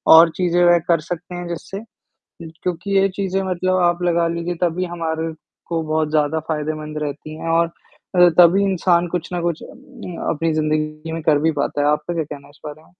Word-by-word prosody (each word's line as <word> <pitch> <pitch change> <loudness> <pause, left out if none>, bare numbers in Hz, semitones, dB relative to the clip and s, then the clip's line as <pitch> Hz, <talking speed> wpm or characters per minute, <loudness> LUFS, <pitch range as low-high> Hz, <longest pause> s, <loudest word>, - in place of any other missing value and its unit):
और 165 +1 +8
चीज़ें 175 -1 +2
वह 175 0 +6
कर 170 -2 +3
सकते 175 +1 -5
हैं 175 0 -5
जिससे 175 +3 -6 0.6
क्योंकि 175 +4 -3
ये 195 - +4
चीज़ें 195 0 -2
मतलब 185 0 0
आप 175 +1 +1
लगा 170 -1 +2
लीजिए 170 +1 -3
तभी 175 +2 0
हमारे 165 -2 -3 0.3
को 165 -1 -1
बहुत 155 0 0
ज़्यादा 155 +1 +1
फ़ायदेमंद 155 0 -3
रहती 150 +2 -6
हैं 165 - -4
और 165 +1 +3
अ, 180 +1 +1
तभी 180 +3 +7
इंसान 175 -1 +2
कुछ 175 0 -4
ना 175 - -1
कुछ 170 -2 -2
अ, - - -9 0.6
अपनी 165 +1 0
ज़िंदगी 155 +1 -1
में 165 0 -4
कर 150 -2 +4
भी 160 +1 +2
पाता 145 0 -1
है। 145 - +2
आपका 160 +3 -1
क्या 165 -2 -1
कहना 145 -1 -10
है - - -17
इस - - -26
बारे 150 +1 -8
में? 175 - -25
165 Hz, 205 wpm, -20 LUFS, 155-175 Hz, 0.6 s, और